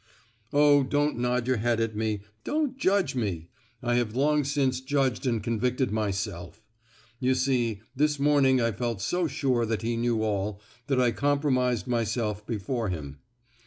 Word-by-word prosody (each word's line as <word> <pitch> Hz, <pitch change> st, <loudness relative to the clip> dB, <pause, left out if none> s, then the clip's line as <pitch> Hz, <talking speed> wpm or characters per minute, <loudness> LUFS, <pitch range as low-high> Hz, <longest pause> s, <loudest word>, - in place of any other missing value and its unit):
"Oh! 145 Hz, 0 st, +5 dB
don't 145 Hz, 0 st, 0 dB
nod 125 Hz, 0 st, 0 dB
your 130 Hz, 0 st, +1 dB
head 115 Hz, +1 st, +1 dB
at 115 Hz, -1 st, -1 dB
me, 110 Hz, -1 st, -1 dB, 0.2 s
don't 300 Hz, -4 st, -1 dB
judge 195 Hz, -, +1 dB
me! 95 Hz, -10 st, -3 dB, 0.3 s
I 120 Hz, 0 st, +1 dB
have 120 Hz, -2 st, -1 dB
long 150 Hz, +2 st, +2 dB
since 135 Hz, -2 st, 0 dB
judged 130 Hz, -2 st, 0 dB
and 115 Hz, -4 st, 0 dB
convicted 125 Hz, +2 st, 0 dB
myself. 100 Hz, -3 st, -3 dB, 0.6 s
You 130 Hz, 0 st, +2 dB
see, 125 Hz, -5 st, 0 dB
this 150 Hz, +2 st, +2 dB
morning 140 Hz, -2 st, +4 dB
I 115 Hz, -1 st, +1 dB
felt 115 Hz, 0 st, -3 dB
so 175 Hz, -, 0 dB
sure 130 Hz, -4 st, 0 dB
that 110 Hz, -3 st, -2 dB
he 115 Hz, +1 st, 0 dB
knew 115 Hz, -1 st, 0 dB
all, 100 Hz, -1 st, -1 dB, 0.3 s
that 135 Hz, -2 st, +1 dB
I 125 Hz, -2 st, +3 dB
compromised 130 Hz, -4 st, +1 dB
myself 115 Hz, -3 st, -1 dB
before 115 Hz, 0 st, -2 dB
him. 70 Hz, -6 st, -6 dB
120 Hz, 160 wpm, -27 LUFS, 110-135 Hz, 0.6 s, Oh